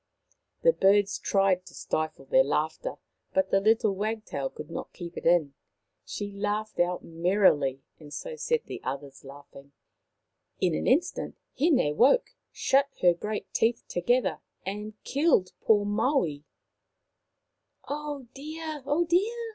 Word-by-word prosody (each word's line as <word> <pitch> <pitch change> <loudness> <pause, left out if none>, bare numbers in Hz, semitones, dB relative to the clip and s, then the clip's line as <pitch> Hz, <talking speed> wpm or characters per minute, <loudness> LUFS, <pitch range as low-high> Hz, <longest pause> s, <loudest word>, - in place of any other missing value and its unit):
The - - +6
birds 200 - +3
tried 195 -2 +2
to - - -13
stifle 155 -3 -3
their 130 0 +5
laughter, 155 - -2 0.4
but 285 0 +2
the 195 - +5
little 220 0 +3
wagtail 210 -9 -3
could 150 +1 -10
not - - -6
keep 175 -2 -8
it - - -3
in. 165 -5 +3 0.5
She 205 0 -5
laughed 210 +2 -3
out 175 +1 +1
merrily, 165 -6 +2 0.2
and 150 -2 -13
so 485 - -6
set 470 0 -1
the - - -7
others 135 +1 -6
laughing. 140 0 -13 0.9
In - - +2
an 75 - -1
instant 350 +4 +1 0.2
Hine 265 - +3
woke, 265 - +4 0.2
shut 275 +1 +2
her 175 -1 +7
great 210 +5 -5
teeth 230 +1 +1
together, 240 +8 +1 0.3
and 210 +2 -5
killed 275 - +2
poor 205 -2 +4
Maui. 205 - 0 0.7
" - - -39
Oh, 290 -2 -4
dear! 310 +1 -6
oh, 305 +4 +2
dear 445 +7 0
205 Hz, 140 wpm, -28 LUFS, -, 0.9 s, her